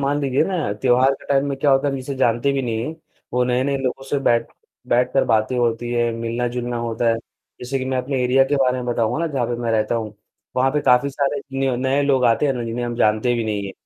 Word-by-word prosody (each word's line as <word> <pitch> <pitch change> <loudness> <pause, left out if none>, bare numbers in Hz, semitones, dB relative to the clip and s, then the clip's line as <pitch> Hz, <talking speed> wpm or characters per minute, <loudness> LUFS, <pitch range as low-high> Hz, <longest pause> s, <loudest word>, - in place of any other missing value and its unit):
मान 140 +1 0
लीजिए 135 -2 +1
ना 170 - -1
त्योहार 130 +1 +4
के - - -16
टाइम 140 0 +2
में 140 - -2
क्या 145 +1 +2
होता 135 +1 +3
है, 140 - -2
जिसे 135 +1 -5
जानते 125 +1 +2
भी 135 -1 -1
नहीं। 120 +5 -3 0.4
वो 125 - +2
नए-नए 130 +3 0
लोगों 135 0 -3
से 145 - +1
बैठ 120 -4 +2 0.4
बैठकर 125 +2 +2
बातें 110 +2 +1
होती 120 0 0
हैं, 120 -1 +1
मिलना-जुलना 120 +1 -3
होता 115 0 -1
है। 115 - +3 0.5
जैसे 130 +2 -2
कि 130 - -3
मैं 130 0 -1
अपने 130 0 -1
एरिया 130 +2 +4
के 145 +2 0
बारे 130 -2 +2
में 125 - -6
बताऊँगा 120 +1 0
ना, 170 - 0
जहाँ 130 -4 0
पर 120 0 -2
मैं 115 - -1
रहता 110 0 +1
हूँ। 110 -2 -3 0.4
वहाँ 130 +1 +3
पे 150 - +1
काफ़ी 125 +1 +3
सारे 140 +1 -1 0.2
न्यू 135 -1 +1
नए 130 +3 +1
लोग 135 -3 +2
आते 115 +5 +3
हैं 140 - +2
ना 120 -2 -4
जिन्हें 115 +1 -3
हम 120 0 -3
जानते 110 +2 +2
भी 115 -1 -1
नहीं 105 -2 -2
हैं। 95 - -7
125 Hz, 245 wpm, -21 LUFS, 120-135 Hz, 0.5 s, त्योहार